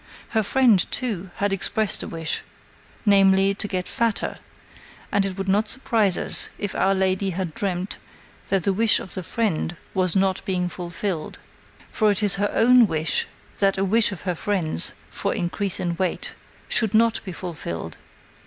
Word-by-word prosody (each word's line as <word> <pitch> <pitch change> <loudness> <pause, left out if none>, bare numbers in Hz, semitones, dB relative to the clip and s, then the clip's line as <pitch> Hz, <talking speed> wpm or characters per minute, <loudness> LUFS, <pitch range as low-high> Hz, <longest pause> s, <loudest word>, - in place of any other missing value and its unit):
Her 220 - +2
friend, 225 -3 +4
too, 200 -8 -1
had 200 0 0
expressed 210 +2 -1
a - - -5
wish, 165 -1 -3 0.6
namely, 195 -1 +5
to 205 +1 -4
get 185 -2 -2
fatter, 230 -2 -1 0.7
and 195 -1 +2
it 190 -1 -6
would 195 0 -3
not 205 +3 +2
surprise 220 -5 +1
us - - -2
if 205 - -3
our 195 +1 +2
lady 190 +1 +1
had 180 -2 -3
dreamt 185 0 -3 0.5
that 195 -3 +1
the 195 - +2
wish 220 +2 +3
of 185 - -8
the 185 - -3
friend 175 -3 -1 0.2
was 185 -1 +5
not 190 -1 +1
being 180 -3 -1
fulfilled. 175 -1 -4 0.5
For 215 -2 +2
it 205 0 +1
is 195 -1 +2
her 205 - +2
own 245 0 +6
wish 160 -2 0 0.3
that 195 -1 +3
a 195 - +1
wish 215 +2 +3
of 195 - -7
her 180 -1 0
friend's 170 - -1 0.2
for - - -2
increase 185 +2 -1
in 175 -1 -1
weight 185 -1 -2 0.3
should 220 -2 +1
not 230 0 +3
be 190 - -6
fulfilled. 155 - -6
195 Hz, 170 wpm, -24 LUFS, 180-210 Hz, 0.7 s, own